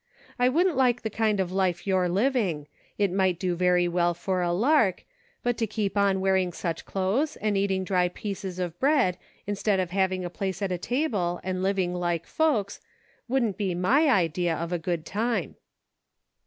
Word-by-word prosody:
I 250 0 +4
wouldn't 340 +5 +2
like 250 -2 +2
the 220 - -3
kind 215 -2 +1
of 185 -2 -1
life 185 -2 0
you're 185 -2 +1
living; 195 - 0 0.3
it 200 -3 +1
might 190 -2 +1
do 180 -1 -1
very 180 0 +3
well 175 0 +1
for 185 +1 -1
a 175 -1 0
lark; 215 - +2 0.4
but 245 -1 0
to 225 - 0
keep 210 -1 -2
on 200 -1 +2
wearing 190 -1 +1
such 165 -1 -4
clothes 215 +12 0
and 210 -1 -1
eating 195 -1 +1
dry 180 -1 +2
pieces 190 -1 -6
ot 175 -2 -4
bread, 270 - +2 0.3
instead 205 -1 0
of 180 -2 -2
having 190 -1 0
a - - -3
place 195 +2 -3
at 195 - -1
a 180 - -2
table, 205 - -1
and 185 0 -2
liv 195 +1 0
ing 180 -2 0
like 175 -2 -1
folks, 240 -12 0 0.5
wouldn't 235 -5 0
be 190 -4 -1
my 265 - +3
idea 175 - +1
of 170 +2 -4
a 175 - 0
good 165 -1 -3
time." 230 +6 -2
190 Hz, 185 wpm, -26 LUFS, 180-220 Hz, 0.5 s, I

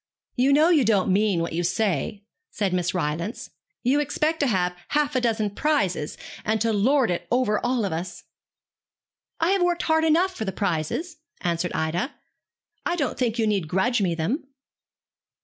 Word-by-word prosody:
'You 260 +2 +3
know 305 +4 +5
you 315 -6 +5
don't 200 -4 +2
mean 200 -3 +2
what 170 - -4
you 170 - 0
say,' 200 +1 -1 0.3
said 195 -3 -1
Miss 180 0 0
Rylance. 170 +6 -3 0.3
'You 265 +4 +3
expect 305 +3 0
to 285 - +2
have 180 -5 +1
half 295 -1 0
a 255 - +2
dozen 220 -3 0
prizes, 200 - 0 0.3
and 220 +1 0
to 225 +1 +1
lord 245 +3 +3
it 175 - -3
over 240 -4 +1
all 245 -3 +1
of 190 - -2
us.' 175 +2 -5 1.2
'I 330 +3 +2
have 390 -1 +2
worked 350 -1 +1
hard 320 0 +2
enough 340 +4 +3
for - - -3
the 195 - -2
prizes,' 200 - -2 0.2
answered 175 0 -1
Ida. 170 - -1 0.7
'I 350 - 0
don't 290 -7 -2
think 240 -3 0
you 225 - +2
need 200 -6 0
grudge 205 +8 +1
me 175 -4 +1
them.' 225 - -2
220 Hz, 175 wpm, -24 LUFS, 180-285 Hz, 1.2 s, know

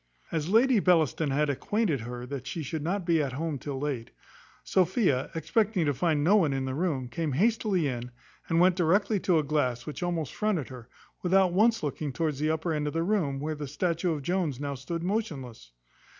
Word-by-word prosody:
As 160 0 -2
Lady 235 +3 +5
Bellaston 165 -5 +2
had 150 +2 +1
acquainted 165 - 0
her 120 +2 -6
that 130 -1 -6
she 165 - -4
should 155 +3 -4
not 180 +4 -2
be 165 -2 +3
at 135 -3 -2
home 155 0 -3
till 140 -1 -5
late, 135 -5 -3 0.5
Sophia, 180 - +2
expecting 205 +1 +1
to 145 - +2
find 150 +2 +1
no 195 +7 +5
one 160 -8 +2
in 135 0 -1
the 130 - -3
room, 145 -5 -1
came 150 +4 -3
hastily 205 - +2
in, 125 -2 -4 0.4
and 165 0 +3
went 180 0 +5
directly 195 +4 +2
to 180 -2 +2
a 155 - +2
glass 130 -5 -1
which 150 - -6
almost 170 -5 -2
fronted 205 - -1
her, 125 -2 -11 0.3
without 185 0 +3
once 225 +3 +3
looking 145 0 -3
towards 150 0 -2
the 155 +1 +1
upper 160 +1 -1
end 150 -1 -1
of 150 - -3
the 165 +1 0
room, 170 -8 0
where 155 +2 -2
the 150 -1 -6
statue 170 +4 0
of 145 -3 -5
Jones 170 -6 -1
now 140 -1 -3
stood 165 +6 -5
motionless. 145 - -4
160 Hz, 205 wpm, -28 LUFS, 140-180 Hz, 0.5 s, Lady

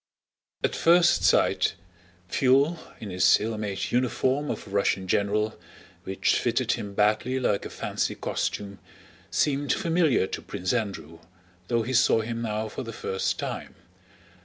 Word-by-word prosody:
At - - 0
first 170 +1 +4
sight, - - +3 0.5
Pfuel, 140 - +3 0.2
in 105 -3 -7
his 90 0 +5
ill 110 +1 -3
made 100 -2 -3
uniform 130 +3 +1
of - - -4
a 100 - -12
Russian 100 -1 0
general, 105 +3 0 0.5
which 95 0 +1
fitted - - 0
him 100 -1 -4
badly 110 +5 +2
like 105 -5 0
a - - -12
fancy - - -2
costume, 100 -1 -3 0.5
seemed 145 -2 +1
familiar 165 - +2
to - - -5
Prince 90 0 -3
Andrew, 100 -8 -3 0.5
though 115 -1 +1
he 130 +4 -4
saw 120 -2 +4
him 115 +1 -4
now 110 -1 -2
for 110 - -6
the 115 -3 -6
first 95 -3 -2
time. - - -5
110 Hz, 145 wpm, -26 LUFS, 100-130 Hz, 0.5 s, his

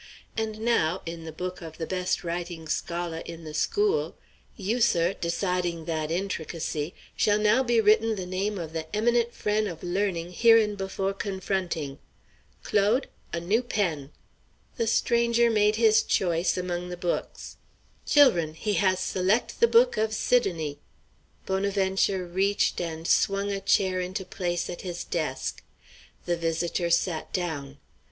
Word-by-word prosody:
And 220 -1 -3
now, 190 -7 +1
in 165 -1 -6
the 160 - -6
book 180 +3 -5
of 160 -2 -9
the 165 - -3
best 180 +1 -1
writing 170 -1 -4
scholar 170 0 -2
in 165 0 -8
the 155 -1 -8
school 415 - +1 0.4
you, 220 +4 -1
sir, 175 -5 +3
deciding 175 -2 -2
that 160 -2 -2
intricacy 165 -3 -3 0.2
shall 210 -1 +3
now 215 +4 +4
be 240 -3 +2
written 220 +1 +4
the 185 -3 -5
name 195 +3 -2
of 165 -3 -6
the 160 -1 -4
eminent 235 +2 +2
frien' 210 -1 0
of 170 -4 -7
learning 180 -1 -1
hereinbefo' 205 -3 +3
confronting. 185 -7 -3 0.6
Claude! 210 +6 +2 0.2
a 170 - -2
new 200 +8 +1
pen!" 170 - -2 0.7
The 230 - 0
stranger 235 +1 +3
made 210 -1 +3
his 220 -1 +5
choice 175 -3 +1
among 180 -1 -3
the 180 - -5
books. 175 -1 -4 0.5
"Chil'run, 175 - +4
he 210 +5 -2
has 185 -2 +2
select' 190 +4 0
the 465 - +6
book 475 +2 +4
of 220 0 0
Sidonie!" 165 -14 0 0.7
Bonaventure 190 -1 +1
reached 195 +3 +1
and 165 -1 -4
swung 200 +1 +2
a 195 0 -3
chair 190 -1 +2
into 185 +2 -4
place 175 -2 -2
at 175 - -6
his 175 -2 -5
desk. 155 -6 -3 0.6
The 175 -1 0
visitor 170 +1 -1
sat 170 -1 0
down. 145 -6 -3
185 Hz, 145 wpm, -27 LUFS, 170-210 Hz, 0.7 s, the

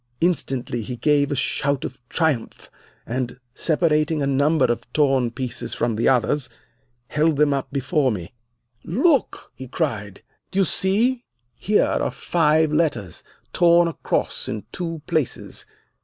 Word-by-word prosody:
Instantly 135 -8 0
he 125 +3 -5
gave 145 +2 +2
a - - 0
shout 140 +1 -1
of 125 - -7
triumph, 160 -9 -1 0.3
and, 125 +1 -3
separating 155 -1 +1
a - - +1
number 140 +2 +3
of 120 0 -2
torn 135 -5 +2
pieces 125 +1 -5
from 120 -2 0
the 115 - +2
others, 130 +2 +1 0.6
held 155 +1 +2
them 145 0 +3
up 135 -1 -3
before 140 0 +1
me. 95 0 -6 0.5
"'Look!' 275 - +1
he 130 +2 -9
cried. 110 - -3 0.3
'Do - - -6
you 195 - +4
see? 230 +9 +2 0.3
Here 205 - +2
are - - 0
five 160 -2 +2
letters, 150 - -1 0.3
torn 170 0 +5
across 165 - -2
in 105 - -4
two 165 -4 -5
places. 155 -7 -2
145 Hz, 140 wpm, -22 LUFS, 125-165 Hz, 0.6 s, torn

